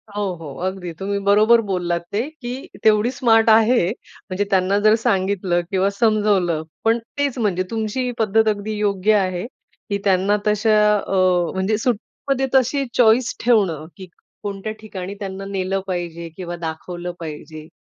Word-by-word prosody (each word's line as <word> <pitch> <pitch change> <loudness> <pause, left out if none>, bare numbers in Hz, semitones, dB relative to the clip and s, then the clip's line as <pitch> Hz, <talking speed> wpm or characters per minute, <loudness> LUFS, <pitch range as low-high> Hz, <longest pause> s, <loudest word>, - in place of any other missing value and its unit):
हो, 205 - -1 0.2
हो, 150 -4 -7
अगदी 185 -2 -4
तुम्ही 195 +4 -3
बरोबर 215 +3 +5
बोललात 175 -3 -1
ते 205 +3 0 0.2
की 250 +2 -6 0.2
तेवढी 220 +2 +4
स्मार्ट 225 -4 +3
आहे, 220 -3 +5
म्हणजे 190 +2 -5
त्यांना 190 0 +2
जर 215 +1 +5
सांगितलं 185 -2 +1
किंवा 190 +1 +2
समजावलं. 200 -6 +1 0.2
पण 225 +1 +3 0.2
तेच 285 -3 0
म्हणजे 190 -5 0
तुमची 220 +2 -2
ही 250 - -1
पद्धत 220 0 +2
अगदी 210 +1 -2
योग्य 205 0 +1
आहे 185 -1 -1 0.4
की 200 - 0
त्यांना 195 +1 +2
तशा 215 +1 +3 0.2
अ, 195 - -3 0.4
म्हणजे 190 +3 0
सुट्टीमध्ये 260 +4 -2
तशी 265 +2 +2
चॉईस 235 +1 +4
ठेवणं, 195 -10 +2
की 190 - -9 0.4
कोणत्या 200 +1 -4
ठिकाणी 195 -3 -7
त्यांना 195 -1 -6
नेलं 195 -1 -2
पाहिजे 170 -2 -4
किंवा 175 -2 -5
दाखवलं 175 +1 -5
पाहिजे, 155 -1 -8
200 Hz, 150 wpm, -21 LUFS, 185-220 Hz, 0.4 s, बरोबर